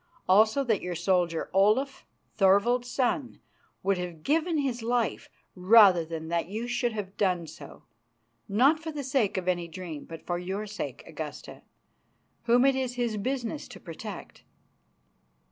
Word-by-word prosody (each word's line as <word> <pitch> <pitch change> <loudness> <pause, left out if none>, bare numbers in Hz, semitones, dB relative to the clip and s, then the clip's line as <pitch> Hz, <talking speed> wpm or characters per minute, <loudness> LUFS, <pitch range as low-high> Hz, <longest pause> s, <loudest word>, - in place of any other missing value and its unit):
Also 215 +8 +4
that 225 -6 0
your 180 -1 -4
soldier, 175 -1 0
Olaf, 215 +8 +2 0.3
Thorvald's 225 +5 +3
son, 250 +1 -1 0.4
would 195 -2 +1
have 175 -3 -6
given 325 +2 +1
his 260 -5 -1
life 235 0 -1 0.2
rather 190 -2 +6
than 160 0 -6
that 170 0 -1
you 215 +5 -4
should 245 0 0
have 205 -3 -6
done 180 -4 +1
so, 145 -2 -12 0.7
not 270 +10 +4
for 325 0 -6
the 295 -2 -5
sake 260 -7 0
of 185 -1 -3
any 175 -2 0
dream, 170 -3 -8
but 165 -1 -10
for 175 0 -2
your 190 +4 -4
sake, 210 0 -6
Augusta, - - -8 0.8
whom 245 +2 +4
it 275 -1 +4
is 255 -2 -2
his 240 -3 -1
business 255 +5 -3
to - - -11
protect." 185 +4 -9
210 Hz, 150 wpm, -28 LUFS, 180-245 Hz, 0.8 s, rather